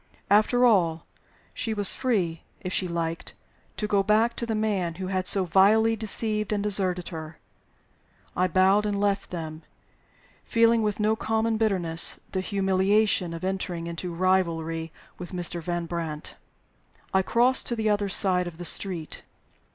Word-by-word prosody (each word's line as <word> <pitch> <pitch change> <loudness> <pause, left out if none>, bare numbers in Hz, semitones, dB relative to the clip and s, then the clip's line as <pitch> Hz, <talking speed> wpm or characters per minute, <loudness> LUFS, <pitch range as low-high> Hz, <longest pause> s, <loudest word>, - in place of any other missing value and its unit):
After 230 +4 +4
all, 170 -8 +2 0.5
she 225 -2 -3
was 205 -2 +5
free 185 -11 -1 0.2
(if 185 - -5
she 185 - 0
liked) 165 -1 -4 0.4
to 210 - -2
go 205 -1 +2
back 220 +4 +2
to 235 - -3
the 225 - -1
man 200 -6 -1
who 185 +1 -5
had 185 -1 -1
so 195 -2 +3
vilely 215 +5 +4
deceived 215 0 -1
and 205 -1 -1
deserted 185 -4 +2
her. 160 -1 -8 1.0
I 185 +1 +2
bowed 195 +3 +3
and 200 -1 -2
left 200 -1 0
them, 160 -2 -6 0.8
feeling 230 -1 +3
with 210 -1 -1
no 215 +1 +2
common 220 0 -1
bitterness 180 -7 +1
the 190 - -2
humiliation 195 -1 +1
of 165 +1 -7
entering 185 -3 -3
into 170 +1 -5
rivalry 165 -3 -1 0.3
with 180 +1 -8
Mr. 175 -1 -2
Van 175 +1 -3
Brandt. 165 -3 -5 0.8
I 190 - +4
crossed 240 +6 +2
to 240 - -1
the 220 -2 0
other 205 -1 0
side 180 -2 +2
of 165 -2 -9
the 175 - -6
street. 175 -4 -1
190 Hz, 155 wpm, -26 LUFS, 170-215 Hz, 1.0 s, was